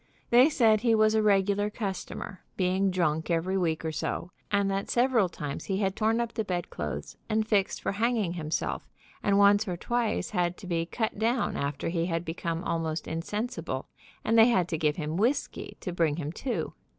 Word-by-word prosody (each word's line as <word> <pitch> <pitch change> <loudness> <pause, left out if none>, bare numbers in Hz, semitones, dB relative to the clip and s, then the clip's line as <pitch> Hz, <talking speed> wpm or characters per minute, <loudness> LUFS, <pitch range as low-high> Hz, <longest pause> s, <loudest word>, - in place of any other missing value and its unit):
They 250 +5 +7
said 225 -7 +4
he 230 -2 +4
was 215 0 +4
a 220 - +3
regular 205 0 +3
customer, 195 -2 -5 0.2
being 190 +1 +2
drunk 165 -3 0
every 170 +3 +1
week 165 -4 0
or 160 - -1
so, 170 +3 -3 0.2
and 200 -1 +2
that 195 0 -2
several 240 -6 +3
times 145 -4 -5
he 195 - -1
had 195 -1 0
torn 225 +2 +2
up 235 -1 -2
the 220 - -1
bedclothes 75 - -4
and 220 0 +1
fixed 200 -3 +1
for - - 0
hanging 215 -3 0
himself, 160 -2 -3 0.3
and 200 -1 +2
once 205 +1 +5
or 180 -2 -2
twice 240 +4 -1
had 180 -3 0
to 200 - -11
be 165 -2 -1
cut 220 +2 -2
down 235 +3 +1
after 140 +3 -2
he 170 0 0
had 165 -1 -2
become 165 +1 -3
almost 165 -1 -2
insensible, 170 - -3 0.4
and 225 +1 +4
they 225 - +8
had 185 -8 +3
to 160 - -1
give 150 -1 +2
him 155 0 -3
whisky 240 +8 -1
to 180 - -4
bring 165 -4 +2
him 150 -2 -4
to. 250 +8 -3
190 Hz, 190 wpm, -28 LUFS, 165-220 Hz, 0.4 s, they